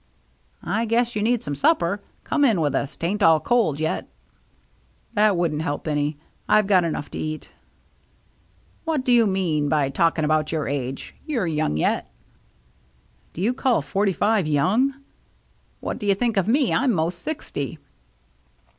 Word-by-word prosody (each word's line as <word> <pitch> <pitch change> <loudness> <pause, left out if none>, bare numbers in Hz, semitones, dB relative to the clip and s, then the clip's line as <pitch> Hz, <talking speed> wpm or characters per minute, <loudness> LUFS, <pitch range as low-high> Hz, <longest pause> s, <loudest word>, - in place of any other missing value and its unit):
" - - -36 0.2
I 230 - 0
guess 235 +1 +1
you 210 - -1
need 235 +2 +1
some 145 - -3
supper. 195 - +1 0.2
Come 290 - 0
in 225 -10 +4
with 145 -3 +1
us, 140 +2 -2
'tain't 195 +5 -2
all 165 -3 +6
cold 205 - +1
yet." 160 0 -2 0.5
" - - -38
That 210 -2 +3
wouldn't 160 -3 0
help 145 0 -3
any. 145 0 -1 0.3
I've 215 -2 +4
had 185 -3 +4
enough 155 -3 -3
to - - -5
eat." 155 0 -5 0.7
" - - -37
What 310 -5 -1
do 250 - +3
you 230 -2 +5
mean 165 -7 0
by 145 -2 +2
talking 165 0 +1
about 155 0 +1
your 155 -2 -1
age? 135 -1 -4
You're 250 -11 0
young 155 - 0
yet." - - 0 0.6
" - - -37
Do 170 - -5
you 225 +6 +2
call 250 - +1
forty 195 +8 0
five 205 -2 +1
young? 195 - +2 0.4
" - - -39
"What - - -4
do 205 - -4
you 200 - +4
think 235 +2 0
of 195 -1 +1
me? 265 +3 +2
I'm 270 -2 +2
most 170 0 -1
sixty." 165 - -4
175 Hz, 175 wpm, -23 LUFS, 150-225 Hz, 0.7 s, all